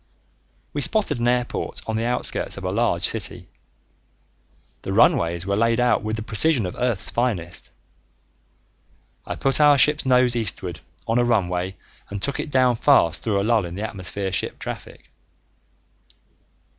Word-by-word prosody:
We -, -, -2 dB
spotted 195 Hz, -, +2 dB
an 120 Hz, -, 0 dB
airport 125 Hz, 0 st, -2 dB
on 110 Hz, -, -3 dB
the 115 Hz, +1 st, -1 dB
outskirts 125 Hz, +1 st, -1 dB
of -, -, -8 dB
a -, -, -2 dB
large -, -, 0 dB
city. -, -, -3 dB, 1.3 s
The -, -, -5 dB
runways 85 Hz, +1 st, +2 dB
were 100 Hz, 0 st, -1 dB
laid 115 Hz, +2 st, +1 dB
out 125 Hz, 0 st, +2 dB
with 110 Hz, +1 st, -3 dB
the 110 Hz, -, -5 dB
precision 120 Hz, +2 st, +2 dB
of 90 Hz, -, -5 dB
Earth's 120 Hz, -5 st, -1 dB
finest. 100 Hz, -9 st, -2 dB, 1.6 s
I -, -, -4 dB
put 135 Hz, +2 st, +2 dB
our 145 Hz, -1 st, +6 dB
ship's 150 Hz, +3 st, +4 dB
nose 125 Hz, -2 st, +3 dB
eastward 90 Hz, -7 st, 0 dB, 0.3 s
on 115 Hz, +2 st, +1 dB
a -, -, +3 dB
runway 95 Hz, -5 st, -1 dB, 0.3 s
and 100 Hz, -, -5 dB
took 140 Hz, +8 st, -1 dB
it -, -, -4 dB
down 130 Hz, -3 st, +2 dB
fast 85 Hz, -, +3 dB
through 105 Hz, -3 st, 0 dB
a -, -, -1 dB
lull 115 Hz, -1 st, +2 dB
in 85 Hz, 0 st, -7 dB
the 100 Hz, -, -5 dB
atmosphere 95 Hz, -1 st, -5 dB
ship 90 Hz, -, -2 dB
traffic. -, -, -9 dB
115 Hz, 155 wpm, -22 LUFS, 95-125 Hz, 1.6 s, our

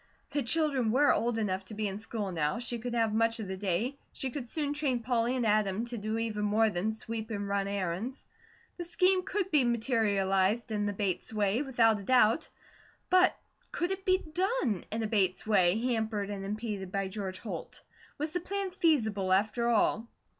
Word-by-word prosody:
The 290 Hz, -, 0 dB
children 275 Hz, -3 st, +2 dB
were 285 Hz, +5 st, +5 dB
old 230 Hz, +1 st, 0 dB
enough 195 Hz, -3 st, -1 dB
to 215 Hz, -, -8 dB
be 215 Hz, 0 st, -1 dB
in 195 Hz, +1 st, -4 dB
school 215 Hz, -3 st, -3 dB
now, 150 Hz, -3 st, 0 dB
she 240 Hz, 0 st, -2 dB
could 240 Hz, +1 st, -4 dB
have 225 Hz, -2 st, +1 dB
much 230 Hz, +1 st, +2 dB
of 215 Hz, -, -4 dB
the 190 Hz, -, -4 dB
day, 205 Hz, +8 st, -1 dB
she 265 Hz, -, -3 dB
could 245 Hz, -2 st, -5 dB
soon 290 Hz, 0 st, -1 dB
train 280 Hz, -5 st, 0 dB
Polly 240 Hz, +1 st, +1 dB
and 245 Hz, -2 st, 0 dB
Adam 210 Hz, 0 st, +1 dB
to 240 Hz, 0 st, -5 dB
do 215 Hz, +2 st, -2 dB
even 220 Hz, -2 st, -2 dB
more 215 Hz, +1 st, +3 dB
than 200 Hz, +4 st, -1 dB
sweep 220 Hz, 0 st, -5 dB
and 205 Hz, -2 st, -3 dB
run 200 Hz, 0 st, 0 dB
errands; 200 Hz, +6 st, -3 dB, 0.5 s
the 350 Hz, -, -4 dB
scheme 365 Hz, +2 st, +3 dB
could 380 Hz, +1 st, -2 dB
be 295 Hz, -4 st, +5 dB
materialized 220 Hz, -3 st, +1 dB
in 205 Hz, -1 st, 0 dB
the -, -, 0 dB
Bates 195 Hz, -1 st, -2 dB
way, 210 Hz, +2 st, +1 dB
without 230 Hz, -6 st, +3 dB
a -, -, -8 dB
doubt; 245 Hz, +3 st, +3 dB, 0.6 s
but 370 Hz, 0 st, +5 dB, 0.3 s
could 350 Hz, +2 st, -1 dB
it 385 Hz, 0 st, -3 dB
be 370 Hz, 0 st, +4 dB
done 355 Hz, -, -1 dB
in 225 Hz, +1 st, -1 dB
a -, -, 0 dB
Bates 190 Hz, -4 st, +1 dB
way, 190 Hz, -3 st, +4 dB
hampered 220 Hz, -4 st, -1 dB
and 195 Hz, -1 st, -5 dB
impeded 205 Hz, -2 st, -4 dB
by 195 Hz, 0 st, -1 dB
George 190 Hz, -1 st, -5 dB
Holt? 220 Hz, -, -7 dB, 0.3 s
Was 300 Hz, +2 st, -3 dB
the 355 Hz, -, -1 dB
plan 390 Hz, +2 st, -3 dB
feasible, 220 Hz, -, +1 dB
after 215 Hz, +5 st, +2 dB
all? 225 Hz, 0 st, +2 dB
225 Hz, 195 wpm, -30 LUFS, 200-255 Hz, 0.6 s, were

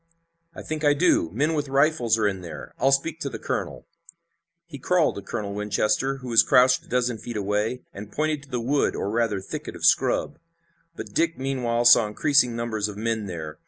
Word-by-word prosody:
"I -, -, -8 dB
think 155 Hz, 0 st, -5 dB
I 145 Hz, -1 st, +4 dB
do. 160 Hz, -, +2 dB
Men 145 Hz, -, 0 dB
with 150 Hz, -2 st, -2 dB
rifles 135 Hz, -5 st, +2 dB
are 110 Hz, -2 st, +2 dB
in 95 Hz, -2 st, -3 dB
there. 85 Hz, -4 st, -9 dB
I'll 135 Hz, -, +3 dB
speak 150 Hz, +4 st, 0 dB
to 140 Hz, -, -3 dB
the -, -, -6 dB
colonel." -, -, -4 dB, 0.8 s
He 155 Hz, -5 st, -10 dB
crawled 175 Hz, +3 st, +2 dB
to -, -, -5 dB
Colonel 100 Hz, 0 st, -5 dB
Winchester, 105 Hz, +6 st, 0 dB
who 130 Hz, -2 st, -9 dB
was 115 Hz, -1 st, +6 dB
crouched 125 Hz, 0 st, +4 dB
a -, -, -23 dB
dozen 125 Hz, -2 st, 0 dB
feet 120 Hz, 0 st, -6 dB
away, 105 Hz, +5 st, -2 dB
and 105 Hz, +1 st, -9 dB
pointed 155 Hz, +1 st, -1 dB
to 140 Hz, -, -17 dB
the 125 Hz, -, -2 dB
wood, 135 Hz, +5 st, 0 dB
or 100 Hz, -, -3 dB
rather 115 Hz, -3 st, 0 dB
thicket 95 Hz, -, -7 dB
of -, -, -3 dB
scrub. -, -, +2 dB, 0.6 s
But 105 Hz, -2 st, -8 dB
Dick 165 Hz, +4 st, +1 dB
meanwhile 125 Hz, -3 st, -1 dB
saw 120 Hz, -2 st, +7 dB
increasing 125 Hz, +2 st, +2 dB
numbers 110 Hz, -3 st, -2 dB
of 105 Hz, -1 st, -8 dB
men 110 Hz, -1 st, -2 dB
there. 80 Hz, -4 st, -7 dB
120 Hz, 200 wpm, -24 LUFS, 105-140 Hz, 0.8 s, saw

